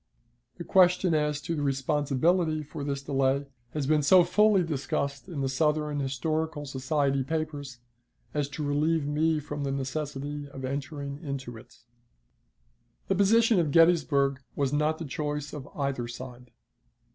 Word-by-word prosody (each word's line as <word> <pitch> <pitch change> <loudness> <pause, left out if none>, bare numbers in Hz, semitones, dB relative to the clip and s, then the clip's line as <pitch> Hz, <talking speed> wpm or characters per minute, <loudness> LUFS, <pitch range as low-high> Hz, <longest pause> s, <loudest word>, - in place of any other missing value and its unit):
The - - -6
question 180 0 +4
as 150 -1 +1
to 165 - -3
the 150 - -2
responsibility 150 +4 +1
for 150 0 -7
this 140 -1 -3
delay 135 0 +1 0.3
has 150 -3 -1
been 150 +1 +3
so 180 +5 +6
fully 210 0 +4
discussed 140 -2 -3
in 155 -6 -4
the 135 - 0
Southern 150 +1 0
Historical 150 +3 -2
Society 135 0 0
papers 145 -3 -4 0.6
as 145 -2 -1
to 150 - -5
relieve 150 +2 +1
me 155 +2 +1
from 145 0 -5
the 140 - -1
necessity 145 +1 -4
of 135 -1 -7
entering 140 +1 -4
into 135 -4 -5
it. 110 - -14 1.3
The 195 - +3
position 220 +2 +4
at 160 -3 +1
Gettysburg 145 -4 +4 0.2
was 140 -1 0
not 150 +2 +1
the 165 - -6
choice 150 +1 -4
of 145 -2 -7
either 140 -4 -2
side. 125 0 -9
145 Hz, 145 wpm, -28 LUFS, 140-155 Hz, 1.3 s, so